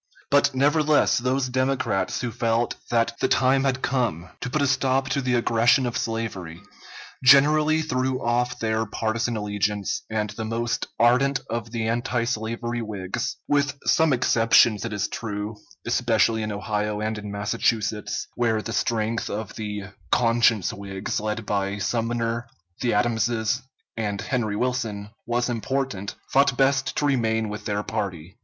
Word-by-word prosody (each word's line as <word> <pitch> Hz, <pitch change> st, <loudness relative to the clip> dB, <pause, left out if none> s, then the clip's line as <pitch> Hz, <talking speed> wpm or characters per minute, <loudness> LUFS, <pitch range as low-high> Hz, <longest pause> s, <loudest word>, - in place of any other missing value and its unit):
But 145 Hz, -1 st, +4 dB
nevertheless 150 Hz, +2 st, +3 dB
those 130 Hz, +2 st, 0 dB
Democrats 130 Hz, -7 st, 0 dB
who 120 Hz, -2 st, -2 dB
felt 115 Hz, 0 st, 0 dB, 0.2 s
that 115 Hz, -1 st, +2 dB
the -, -, +2 dB
time 135 Hz, +1 st, +3 dB
had 130 Hz, -1 st, 0 dB
come 115 Hz, -, -1 dB
to 125 Hz, -, -4 dB
put 150 Hz, +3 st, 0 dB
a -, -, +4 dB
stop 135 Hz, 0 st, +1 dB
to 140 Hz, -, 0 dB
the 125 Hz, -1 st, +1 dB
aggression 120 Hz, +3 st, +3 dB
of 120 Hz, -, -3 dB
slavery, 100 Hz, -8 st, -3 dB, 0.6 s
generally 150 Hz, +4 st, +6 dB
threw 130 Hz, -3 st, -1 dB
off 125 Hz, 0 st, 0 dB
their 110 Hz, -1 st, -1 dB
partisan 115 Hz, +2 st, -1 dB
allegiance, 105 Hz, -1 st, -1 dB
and 105 Hz, -1 st, -1 dB
the 110 Hz, +1 st, -5 dB
most 115 Hz, +1 st, -2 dB
ardent 130 Hz, +4 st, +3 dB
of 115 Hz, -1 st, -3 dB
the 115 Hz, -1 st, -2 dB
antislavery 120 Hz, 0 st, -1 dB
Whigs, 100 Hz, -4 st, -4 dB
with 145 Hz, -1 st, +1 dB
some 160 Hz, -1 st, +4 dB
exceptions 115 Hz, -3 st, +4 dB
it 115 Hz, -, -4 dB
is 105 Hz, -1 st, -1 dB
true, 105 Hz, -1 st, -4 dB, 0.3 s
especially 115 Hz, -2 st, +2 dB
in 110 Hz, 0 st, -3 dB
Ohio 105 Hz, 0 st, -2 dB
and 110 Hz, 0 st, -2 dB
in 105 Hz, -1 st, -7 dB
Massachusetts, 105 Hz, +1 st, -1 dB
where 115 Hz, -2 st, +1 dB
the 115 Hz, -, -4 dB
strength 115 Hz, 0 st, -1 dB
of 110 Hz, 0 st, -4 dB
the 105 Hz, -2 st, -4 dB, 0.3 s
"Conscience 115 Hz, -4 st, +3 dB
Whigs," 100 Hz, -1 st, -4 dB
led 110 Hz, +1 st, -3 dB
by 100 Hz, 0 st, -1 dB
Sumner, 115 Hz, +2 st, -1 dB, 0.3 s
the 120 Hz, -4 st, +1 dB
Adamses, 115 Hz, +2 st, +1 dB, 0.3 s
and 105 Hz, -3 st, -2 dB
Henry 115 Hz, -5 st, -1 dB
Wilson, 110 Hz, -4 st, -2 dB, 0.2 s
was 120 Hz, 0 st, 0 dB
important, 120 Hz, -3 st, -2 dB, 0.2 s
thought 140 Hz, -2 st, +4 dB
best 135 Hz, 0 st, +2 dB
to 145 Hz, -, +1 dB
remain 110 Hz, -5 st, +1 dB
with 105 Hz, +1 st, -7 dB
their 105 Hz, 0 st, -1 dB
party. 95 Hz, -4 st, -4 dB
115 Hz, 150 wpm, -24 LUFS, 105-130 Hz, 0.6 s, generally